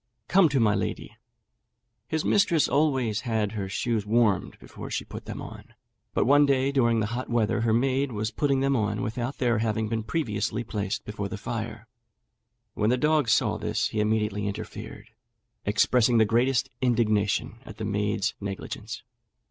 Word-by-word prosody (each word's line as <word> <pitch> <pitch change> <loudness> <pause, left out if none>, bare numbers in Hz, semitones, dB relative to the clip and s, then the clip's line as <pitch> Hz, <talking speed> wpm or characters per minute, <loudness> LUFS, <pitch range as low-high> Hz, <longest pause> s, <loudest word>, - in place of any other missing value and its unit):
come 185 -3 +5
to 135 -1 +1
my 110 -3 +4
lady." - - -3 0.9
His 160 -1 -2
mistress 170 -7 +3
always 130 -8 +1
had 110 -4 -1
her 100 -3 -4
shoes 110 +2 -1
warmed 110 -2 +1
before - - -10
she - - -3
put - - -9
them - - -6
on, - - -11 0.4
but - - +2
one 145 +3 +5
day 135 0 +2
during 120 -4 +2
the - - +1
hot 125 +2 -4
weather 115 -1 +1
her 115 -1 +2
maid 130 +3 +1
was 110 0 -2
putting 140 -1 +1
them 135 0 +2
on 105 -1 -1
without 120 +3 -3
their 120 -4 +1
having 110 -1 -1
been 115 0 -1
previously 110 -3 -2
placed 105 -1 -3
before 105 -1 -4
the 105 - -5
fire. 115 +1 -5 0.9
When 105 - +1
the 125 - +3
dog 150 -2 +2
saw 105 - +2
this - - -1
he 110 - -3
immediately 105 -1 0
interfered, 100 - -7 0.6
expressing 120 +3 +3
the 110 - +5
greatest 125 +4 +1
indignation 110 -5 +1
at - - -11
the - - -4
maid's 105 +1 0
negligence. 100 -1 -6
115 Hz, 165 wpm, -26 LUFS, 105-130 Hz, 0.9 s, come